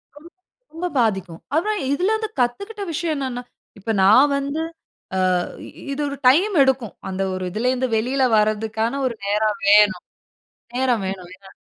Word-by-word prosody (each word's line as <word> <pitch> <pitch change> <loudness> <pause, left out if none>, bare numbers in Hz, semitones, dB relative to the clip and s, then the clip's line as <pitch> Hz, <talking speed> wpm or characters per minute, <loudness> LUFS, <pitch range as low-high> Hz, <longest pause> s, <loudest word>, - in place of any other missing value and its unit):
ரொம் 315 +4 -14 0.4
ரொம்ப 355 +2 -3
பாதிக்கும். 190 -7 -1
அப்புறம் 415 +6 +1
இதிலருந்து 435 +7 0
கத்துக்கிட்ட 400 - -1
விஷயம் 325 -1 -1
என்னன்னா, 255 -2 -4 0.4
இப்ப, 225 +3 -3
நான் 255 +9 +6
வந்து 280 +3 -2 0.8
ஆ - - +1 0.5
இது 275 - -3
ஒரு 280 0 -5
டைம் 360 +10 +4
எடுக்கும். 260 -7 0 0.2
அந்த 190 0 -3
ஒரு 185 0 -4
இதிலருந்து 250 +5 0
வெளில 260 +4 0
வரதுக்கான 220 +4 0
ஒரு 245 - -1
நேரம் 210 0 +1
வேணும் 210 +1 +5 0.7
நேரம் 250 -3 +1
வேணும், 185 -2 -5
இல்லையா? 195 0 -17
250 Hz, 140 wpm, -21 LUFS, 210-295 Hz, 0.8 s, நான்